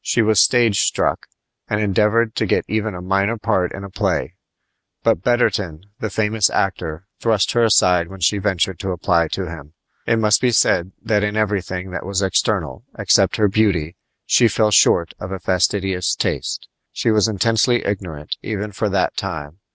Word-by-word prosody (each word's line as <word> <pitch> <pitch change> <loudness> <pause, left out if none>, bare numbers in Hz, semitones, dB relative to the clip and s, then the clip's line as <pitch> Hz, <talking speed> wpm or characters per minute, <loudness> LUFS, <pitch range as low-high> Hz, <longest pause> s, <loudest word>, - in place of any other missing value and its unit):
She 115 - +1
was 110 -2 +4
stage 115 -5 +3
struck, - - 0 0.4
and 105 - 0
endeavored 105 +2 +1
to - - -1
get - - +1
even 110 -1 -2
a 90 - -8
minor 100 +4 0
part 90 -4 0
in 100 - -8
a 100 - -8
play; 95 -6 -1 0.7
but - - +2
Betterton, 100 -8 0
the 110 - -3
famous 110 0 +1
actor, 85 -3 -2
thrust 110 -4 +1
her 120 - +1
aside 90 -6 +3
when 95 +2 -11
she 100 +4 +1
ventured 95 -3 -1
to 95 -1 -3
apply 85 -1 +1
to 95 +4 -4
him. 80 -3 -10 0.3
It 115 - +3
must 105 -1 +3
be 125 - +3
said 95 -5 +2
that 105 -2 +1
in 105 +1 -1
everything 95 -3 -2
that 90 - -5
was 100 +1 -2
external, 90 - -1
except - - +3
her 105 - +3
beauty, 95 -6 0 0.3
she 120 - +4
fell 110 0 +1
short 85 -3 +4
of 95 - -7
a 95 - -3
fastidious 95 0 0
taste. - - -3 0.2
She 115 - 0
was 105 -1 +3
intensely 115 +3 +1
ignorant 90 -7 -4
even 105 -1 -4
for 105 +1 -2
that 95 -2 0
time. 80 -3 -5
100 Hz, 175 wpm, -20 LUFS, 90-110 Hz, 0.7 s, was